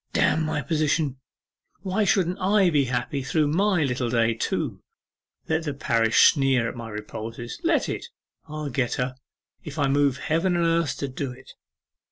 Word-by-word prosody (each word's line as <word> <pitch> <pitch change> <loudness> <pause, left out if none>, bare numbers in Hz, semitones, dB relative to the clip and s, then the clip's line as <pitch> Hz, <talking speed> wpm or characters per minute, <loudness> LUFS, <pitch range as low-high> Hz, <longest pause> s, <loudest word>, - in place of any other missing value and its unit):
'Damn 160 - +2
my 155 -2 -2
position! 150 -1 0 0.7
Why 200 +2 0
shouldn't 185 -2 +1
I 195 -1 +3
be 145 -3 +3
happy 125 +2 -2
through 150 +2 +1
my 185 +1 +2
little 125 -3 -1
day 115 -1 +2
too? 115 - -3 0.7
Let 160 +1 0
the 145 -2 -3
parish 115 -5 +4
sneer 135 -4 +2
at - - -5
my 115 -1 -7
repulses, 110 +2 -7
let - - +2
it. - - -4 0.4
I'll 155 -2 -5
get 125 -1 0
her, 125 0 -2 0.5
if 150 0 -8
I 145 -2 +2
move 140 -1 +2
heaven 170 +3 0
and 170 -1 +2
earth 165 -4 +1
to 140 - -3
do 130 0 -4
it! 125 +1 -13
140 Hz, 170 wpm, -25 LUFS, 125-165 Hz, 0.7 s, parish